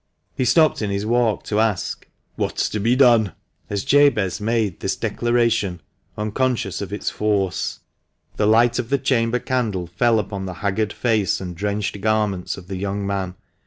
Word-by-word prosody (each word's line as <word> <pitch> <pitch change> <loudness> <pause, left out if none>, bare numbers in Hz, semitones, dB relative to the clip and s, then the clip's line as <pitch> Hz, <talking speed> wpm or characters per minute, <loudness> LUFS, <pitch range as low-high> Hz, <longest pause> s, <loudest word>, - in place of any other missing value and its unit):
He 130 - 0
stopped 155 +2 +4
in 105 - -1
his 100 +1 -2
walk 115 -1 +1
to 105 - -1
ask, 110 -4 -1 0.3
"What's - - -1
to 105 - -3
be 115 +4 +2
done?" 120 -6 +5 0.4
as 100 -1 -2
Jabez 135 -10 +3
made 110 -5 0
this 95 0 -1
declaration, 115 -3 0 0.4
unconscious 115 +4 -1
of 100 -1 -5
its 105 - -2
force. 100 -4 -1 0.6
The 105 - +2
light 115 +2 +4
of 120 -2 -3
the 140 - +3
chamber 125 -3 +1
candle 115 -8 -1
fell 110 +7 +2
upon 100 -2 -3
the 90 - -6
haggard 105 +2 0
face 110 -5 +1
and 90 -2 -6
drenched 105 +1 -2
garments 105 -4 0
of 95 - -10
the 95 -1 -5
young 100 +1 -3
man. 95 -2 -2
105 Hz, 165 wpm, -22 LUFS, 100-120 Hz, 0.6 s, done